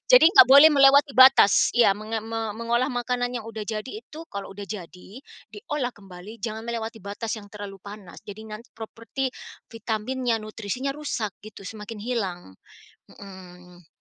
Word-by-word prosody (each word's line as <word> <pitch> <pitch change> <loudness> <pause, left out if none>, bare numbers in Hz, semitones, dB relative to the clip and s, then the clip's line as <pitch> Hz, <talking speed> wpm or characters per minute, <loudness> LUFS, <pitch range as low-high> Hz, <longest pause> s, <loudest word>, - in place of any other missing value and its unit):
Jadi 340 -9 +8
nggak 390 0 +8
boleh 280 +4 +9
melewati 280 +1 +5
batas 260 -6 +6
iya, 240 -3 +5
menga 215 +1 -4
me 225 -1 -4
mengolah 235 +2 0
makanan 245 0 -2
yang 235 - -4
sudah 220 -2 -6
jadi 215 +3 -5
itu 315 +2 -11
kalau 200 -1 -7
sudah 205 - -8
jadi, 190 +2 -9 0.3
diolah 295 - -4
kembali 195 0 -13
jangan 220 +1 -5
melewati 230 -1 -5
batas 205 +3 -5
yang 205 - -15
terlalu 200 -2 -9
panas. 200 -3 -11
Jadi 215 +2 -10
nanti 215 +2 -10
properti 230 +4 -6 0.4
vitaminnya, 230 +2 -3
nutrisinya, 220 +5 -5
rusak 260 -9 -4
gitu, 210 -2 -12
semakin 210 +1 -8
hilang, 195 - -4 0.5
mhm. 180 -3 -14
220 Hz, 150 wpm, -24 LUFS, 205-245 Hz, 0.5 s, boleh